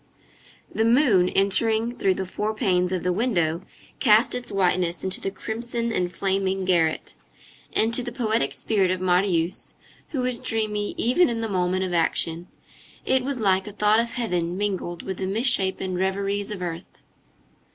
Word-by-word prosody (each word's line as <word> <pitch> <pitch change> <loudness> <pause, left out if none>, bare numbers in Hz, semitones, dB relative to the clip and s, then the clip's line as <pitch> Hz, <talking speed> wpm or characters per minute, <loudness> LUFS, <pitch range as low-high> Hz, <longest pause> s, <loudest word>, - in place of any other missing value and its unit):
The 220 - +1
moon, 230 -7 +4
entering 220 +4 +2
through 190 -5 +1
the 190 - -3
four 210 +4 -3
panes 180 -3 +1
of 185 -2 -2
the 180 - +1
window, 175 -7 0 0.4
cast 220 -1 +4
its 245 -1 -4
whiteness 180 -3 +1
into 190 0 -1
the - - -2
crimson 235 +3 -3
and 180 -1 -1
flaming 190 +1 -1
garret; 165 -4 +1 0.6
and 225 +1 +1
to 250 - +4
the 240 - -5
poetic 225 - 0
spirit 190 +7 +1
of 185 0 -1
Marius, 180 -1 0 0.3
who 275 - -2
was 250 -1 -1
dreamy 210 -2 -1
even 260 +10 +3
in 230 -1 -2
the 225 - -2
moment 185 -1 0
of 185 -1 -3
action, 165 0 0 0.6
it 260 -1 +2
was 270 -1 -2
like 190 -2 +2
a - - -5
thought 210 +2 +3
of 235 0 -1
heaven 180 -7 -2
mingled 190 -4 -3
with 190 -2 -5
the 190 - -3
misshapen 190 -3 +1
reveries 195 +2 -1
of 195 -4 -5
earth. 170 0 -7
195 Hz, 165 wpm, -24 LUFS, 180-225 Hz, 0.6 s, moon